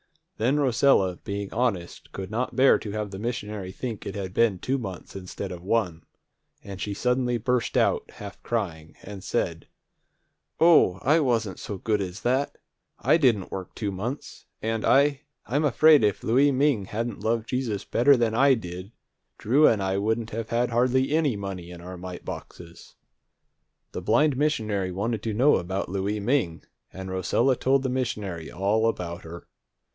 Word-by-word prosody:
Then 130 +7 +2
Rosella, 120 -9 +3
being 100 0 -5
honest, 110 -8 -2
could 95 0 -7
not 120 +4 -2
bear 135 +1 +5
to 105 - -7
have 105 -1 -4
the 95 - -7
missionary 105 -4 -4
think 115 +1 -6
it 95 - -5
had 95 -2 -5
been 110 -4 +3
two 135 +8 -1
months 95 -7 -8
instead 90 -2 -6
of 90 -1 -7
one, 95 -4 0 0.6
and 100 -1 -8
she 100 -1 -3
suddenly 125 +1 +1
burst 125 +1 0
out, - - +1
half 100 -1 -9
crying, 85 -9 -3
and 100 -1 -9
said, - - -2 0.9
"O, 160 - +5
I 155 +5 +4
wasn't 115 - 0
so 100 - -5
good 105 +2 0
as 95 +1 -5
that! 130 +3 0 0.4
I - - +3
didn't 120 - +2
work 95 -2 -6
two 105 -3 -2
months, 115 +9 -6
and 110 0 -2
I 140 0 +3 0.2
I'm 145 +5 0
afraid 150 0 +5
if 105 -2 +1
Louie 135 +5 +4
Ming 135 -6 +2
hadn't 115 +2 -4
loved 115 0 -1
Jesus 120 -6 -2
better 135 +3 +4
than 115 -2 +1
I 135 +3 +5
did, 90 -2 -7 0.5
Drew 140 +8 +4
and 105 -4 +2
I 95 0 0
wouldn't 110 +2 -1
have 115 0 -4
had 120 +1 0
hardly 130 +3 +2
any 155 -6 +2
money 95 -3 -6
in 90 -1 -10
our 90 +1 -8
mite 90 0 -8
boxes." 85 -1 -10 1.0
The - - -5
blind 140 +6 +3
missionary 110 -10 0
wanted 105 +4 -2
to 110 -2 -3
know 135 +7 +5
about 95 +1 -3
Louie 100 +3 -2
Ming, 105 -7 0 0.3
and 95 0 -7
Rosella 115 +8 +1
told 135 +2 +2
the 130 - -1
missionary 105 -10 -3
all 105 +4 +1
about 85 -5 -5
her. 85 +1 -10
110 Hz, 170 wpm, -26 LUFS, 95-125 Hz, 1.0 s, bear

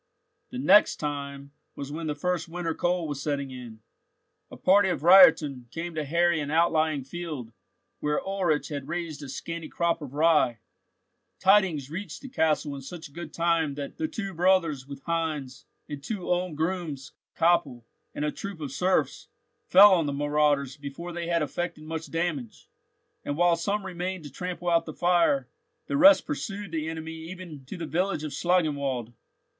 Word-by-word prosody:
The 255 - -7
"next 210 -5 +5
time" 140 -1 -5 0.2
was 140 0 -6
when 160 +1 -4
the 150 - -2
first 180 +3 -2
winter 170 -1 -3
cold 175 -1 0
was 145 -2 -4
setting 140 -2 -2
in. 120 -4 -10 0.7
A - - -11
party 195 +1 +4
of 175 -4 -2
reitern 160 -9 +6
came 170 +4 -5
to 155 -1 -2
harry 170 +3 +2
an 145 -1 -3
outlying 155 -2 +2
field, 145 -6 -6 0.5
where 150 0 0
Ulrich 185 -6 -1
had 140 -3 -5
raised 170 -3 -4
a 140 - -8
scanty 165 +4 -6
crop 170 -1 0
of 140 -2 -8
rye. 155 -6 +3 0.8
Tidings 185 -8 +3
reached 195 - -6
the 270 - -7
castle 155 - +1
in 135 - -7
such 145 +1 -9
good 170 +2 -7
time 165 -4 +1
that 140 -1 -6
the 315 - -1
two 195 -9 -5
brothers, 165 -6 +2
with 140 -1 -9
Heinz, 155 -6 -3 0.2
the 145 - -6
two 180 +6 -5
Ulm 180 -2 0
grooms, 160 -4 -3 0.3
Koppel, 165 -8 +2 0.3
and 150 - -2
a 150 - 0
troop 200 0 -7
of 145 -4 -5
serfs, 185 +7 0 0.4
fell 200 +2 +8
on 165 -5 +2
the 140 - -2
marauders 145 -1 +1
before 145 +5 -7
they 170 0 -4
had 170 -2 +1
effected 170 +2 -4
much 160 +1 -5
damage, 165 -9 -3 0.6
and 145 - -3
while 175 0 +4
some 200 +4 -2
remained 185 -1 -4
to 145 - -9
trample 180 +3 -5
out 165 0 +3
the 155 - -7
fire, 180 - +2 0.4
the - - -3
rest 290 +1 +7
pursued 205 - -5
the 160 -1 -2
enemy 160 0 -6 0.2
even 175 -6 -9
to 160 - -8
the 170 - -4
village 170 +2 -1
of 155 - -4
Schlangenwald. 140 -10 0
165 Hz, 170 wpm, -27 LUFS, 145-175 Hz, 0.8 s, fell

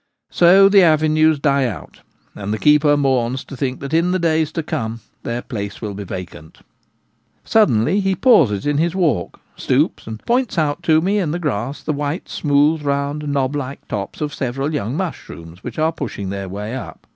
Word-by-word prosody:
So 190 +3 +6
the 200 0 +6
avenues 155 -1 +4
die 140 -2 +2
out, 115 - -8 0.3
and 100 0 -5
the 110 - -1
keeper 150 +3 +4
mourns 130 -2 0
to - - -10
think 130 0 -3
that 140 +2 -6
in 170 +2 +3
the - - +2
days 160 -3 +1
to 165 - -2
come 115 -5 -4 0.2
their 120 +1 -4
place 100 -5 -6
will 105 -3 -5
be 100 +1 -6
vacant. 90 -4 -8 0.9
Suddenly 185 - +3
he 195 -1 +1
pauses 155 - +3
in 145 0 +1
his 170 +2 0
walk, 155 - 0 0.2
stoops, - - 0
and 110 -1 -5
points 245 -3 0
out 150 0 0
to 160 0 +5
me 200 +4 +1
in 175 -6 -1
the 165 - -2
grass 140 -4 -3
the 155 - -1
white, 145 +4 -3
smooth, 150 +1 +2
round 145 +1 -2
knob 140 -1 0
like 140 -1 -6
tops 100 +6 -5
of 150 -1 -2
several 135 +3 -3
young 130 -1 -2
mushrooms 90 - -7
which - - -7
are 160 +1 +2
pushing 115 -10 -5
their 100 -1 -5
way 105 +4 -5
up. 130 - -8
145 Hz, 190 wpm, -19 LUFS, 115-160 Hz, 0.9 s, So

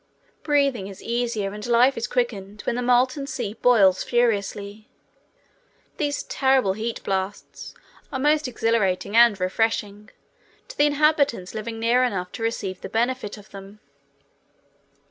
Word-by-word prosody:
Breathing 280 -9 +1
is 195 -1 -11
easier 230 -4 -2
and 210 0 -8
life 245 +3 +4
is 230 - -3
quickened 210 -5 -3
when - - -1
the 250 - -2
molten 255 +3 +2
sea 230 -7 -4
boils 215 -6 +4
furiously. 210 -3 -1 1.1
These 290 -3 -1
terrible 265 -7 +2
heat 225 +3 -5
blasts 195 +1 -4 0.4
are 270 - -2
most 295 +2 +2
exhilarating 220 -5 0
and 230 -4 +6
refreshing 210 +2 -1 0.6
to - - -9
the 290 - +4
inhabitants 290 -9 +1
living 225 +1 -5
near 235 +2 +3
enough 185 -7 -2
to - - -8
receive 205 -5 -3
the - - -7
benefit 235 -2 -1
of 205 0 -16
them. 195 +1 -11
230 Hz, 135 wpm, -23 LUFS, 200-250 Hz, 1.1 s, and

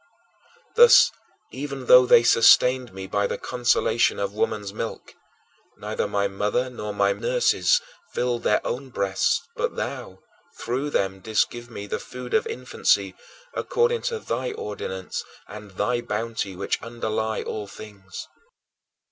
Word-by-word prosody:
Thus 475 +1 +8 0.4
even 140 -1 -6
though 125 +1 +7
they 115 - +7
sustained 125 +2 +5
me 95 0 -7
by 100 +1 0
the - - -3
consolation 120 -2 +1
of 100 0 -2
woman's 105 -1 -2
milk, 115 +1 -6 0.6
neither - - -3
my 100 0 0
mother 105 +6 -1
nor 105 -4 -5
my 100 -1 +2
nurses - - +2 0.3
filled 120 -1 -1
their 105 - +1
own 130 +2 -4
breasts 100 -5 0
but - - -2
thou, - - -5 0.4
through 130 +5 -2
them, 95 -7 -1
didst 110 +2 +1
give 120 0 -9
me 100 -3 -7
the 105 - -3
food 125 -1 -9
of - - +2
infancy 450 - 0 0.4
according 475 0 0
to 475 -2 -2
thy 125 - -3
ordinance 95 -3 -5 0.2
and 105 0 -10
thy 105 +6 -1
bounty 110 -3 -3
which - - -2
underlie 110 -2 -3
all 105 -2 -5
things. 100 -3 -10
115 Hz, 140 wpm, -24 LUFS, 100-125 Hz, 0.6 s, Thus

